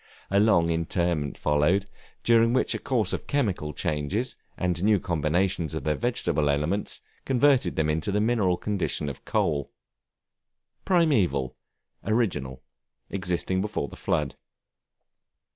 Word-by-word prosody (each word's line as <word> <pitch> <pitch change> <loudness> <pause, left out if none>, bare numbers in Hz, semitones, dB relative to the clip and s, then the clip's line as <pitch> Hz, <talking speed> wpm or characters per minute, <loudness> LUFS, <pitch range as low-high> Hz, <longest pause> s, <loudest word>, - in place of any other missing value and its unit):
A 100 - +4
long 85 -6 +4
interment 85 -2 -1
followed, 85 +7 +2 0.4
during 115 0 +4
which 130 - +2
a - - -3
course 115 -8 0
of - - -4
chemical 100 - -1
changes, 80 - -1 0.2
and 90 -1 -1
new 105 -1 +4
combinations 85 0 0
of 80 - -4
their 75 - +1
vegetable 85 -10 0
elements, 75 +8 -1 0.2
converted 135 0 +3
them 80 0 +1
to 105 - -1
the 105 - +1
mineral 105 -5 +2
condition 95 -8 -2
of 70 - -9
coal. 70 -3 0 1.1
Primeval, 100 - +2 0.5
original, 75 - -1 0.5
existing 95 0 -1
before 105 -8 -3
the - - -11
flood. 75 -3 -1
90 Hz, 125 wpm, -26 LUFS, 75-110 Hz, 1.1 s, A